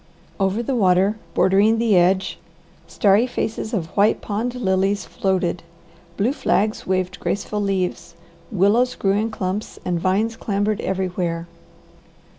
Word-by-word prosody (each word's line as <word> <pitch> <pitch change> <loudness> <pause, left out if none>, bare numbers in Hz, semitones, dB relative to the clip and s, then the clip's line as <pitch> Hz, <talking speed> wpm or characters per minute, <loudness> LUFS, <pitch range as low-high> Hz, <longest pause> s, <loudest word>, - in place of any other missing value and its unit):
Over 195 +4 +1
the 260 +2 -1
water, 195 0 +3 0.2
bordering 205 +4 +4
the 225 -3 +2
edge, 185 +2 +2 0.5
starry 205 +4 +3
faces 220 -2 -3
of 170 -8 -3
white 205 +2 +3
pond 225 +4 -3
lilies 195 -3 0
floated. 185 -3 -1 0.6
Blue 225 +7 +1
flags 215 -6 0
waved 185 -1 -1
graceful 210 +1 -2
leaves, 185 -4 -2 0.4
willows 215 +6 +2
grew 195 - +1
in 210 +3 +1
clumps, 200 -1 -4
and 175 -2 0
vines 200 +6 0
clambered 205 -1 -1
everywhere. 180 -3 -2
195 Hz, 125 wpm, -21 LUFS, 185-215 Hz, 0.6 s, bordering